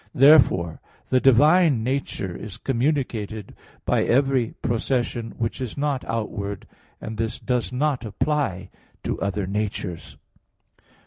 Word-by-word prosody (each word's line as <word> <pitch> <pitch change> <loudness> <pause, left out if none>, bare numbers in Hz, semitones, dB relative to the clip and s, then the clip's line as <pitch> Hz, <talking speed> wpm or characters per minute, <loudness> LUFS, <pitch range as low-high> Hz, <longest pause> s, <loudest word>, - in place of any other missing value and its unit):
Therefore 125 - +5 0.3
the 130 - +4
divine 145 +1 +5
nature 125 -8 -2
is 105 -1 -8
communicated 115 -6 -2 0.3
by - - +2
every 130 -2 +2
procession 120 -1 -1
which 115 +2 -2
is 125 -1 -5
not 140 -2 -1
outward, 100 -3 -4 0.3
and 110 0 -6
this 110 0 -2
does 125 -1 -1
not 135 +1 0
apply 110 -5 -1 0.3
to - - -3
other 100 0 -1
natures. 100 -3 -4
115 Hz, 115 wpm, -24 LUFS, 105-135 Hz, 0.3 s, Therefore